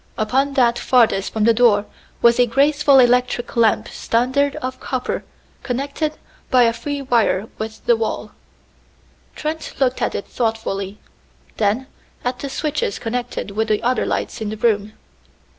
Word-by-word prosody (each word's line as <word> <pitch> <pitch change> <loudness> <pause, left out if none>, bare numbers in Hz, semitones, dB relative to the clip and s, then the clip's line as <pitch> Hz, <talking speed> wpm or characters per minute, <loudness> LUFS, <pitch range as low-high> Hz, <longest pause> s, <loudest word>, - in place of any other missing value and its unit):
Upon 265 +6 +1
that 240 -2 +3
farthest 230 -6 +2
from 220 - -1
the 230 +1 +5
door 220 -3 +4 0.4
was 235 +1 +5
a 245 - +5
graceful 285 +3 +4
electric 250 -1 +2
lamp 225 -3 +3
standard 260 +5 0
of 255 0 -5
copper 255 -1 -3 0.4
connected 280 +4 -2 0.4
by 255 -1 +5
a 230 -1 +3
free 280 +4 -4
wire 225 -5 +1
with 220 0 -6
the 235 - +5
wall. 225 -1 -3 1.0
Trent 315 +1 -4
looked 260 -2 +1
at - - 0
it - - -3
thoughtfully, 210 -4 -3 0.6
then 220 +5 +1 0.4
at 250 0 -2
the 280 - -4
switches 295 -7 -2
connected 240 -2 -4
with 220 +2 -1
the 215 -1 0
other 250 +2 +1
lights - - -3
in 215 - -2
the 215 - -5
room. 215 -2 +1
240 Hz, 150 wpm, -20 LUFS, 220-265 Hz, 1.0 s, the